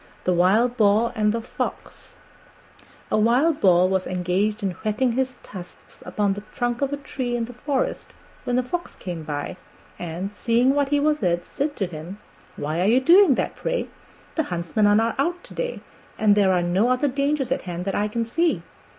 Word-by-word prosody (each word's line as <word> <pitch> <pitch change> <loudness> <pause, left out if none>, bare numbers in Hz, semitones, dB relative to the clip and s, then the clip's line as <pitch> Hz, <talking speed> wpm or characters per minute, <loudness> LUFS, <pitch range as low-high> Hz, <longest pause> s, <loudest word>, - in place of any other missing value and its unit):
THE 180 - +2
WILD 215 +8 +3
BOAR 215 +2 +3
AND 210 -1 +2
THE 230 +1 -3
FOX - - -6 1.0
A - - +3
Wild 260 +8 +3
Boar 180 -1 +5
was 190 0 0
engaged 185 +4 -1
in 195 - 0
whetting 220 +4 +1
his 255 +1 -1
tusks 180 -3 -12
upon 205 -2 0
the 205 - -6
trunk 240 0 -1
of 275 0 0
a 285 - -2
tree 260 -3 -4
in 235 -1 -1
the 245 - -10
forest 270 +2 -2 0.4
when 245 0 0
a 255 - +2
Fox 345 +8 -4
came 175 -3 -6
by 150 +3 -5 0.4
and, 175 +4 -5
seeing 240 +5 +2
what 285 -1 +1
he 290 0 +2
was 300 +1 +1
at, 175 -2 0
said 290 +1 -3
to 195 - -1
him, 170 +2 -8 0.4
"Why 155 +4 -2
are 185 - +2
you 240 +4 +5
doing 340 +1 +6
that, - - -2
pray? - - -2 0.4
The 320 - +1
huntsmen 175 +4 +1
are 205 - +5
not 225 +3 +1
out 350 +5 0
to - - -13
day, - - -3 0.4
and 210 -1 +4
there 200 -2 +4
are 180 -1 +2
no 185 +7 +2
other 255 +3 +2
dangers 280 0 0
at - - 0
hand 175 +1 -4
that 195 - -1
I 210 - +1
can 230 +2 -2
see." 330 +9 0
225 Hz, 200 wpm, -23 LUFS, 185-265 Hz, 1.0 s, doing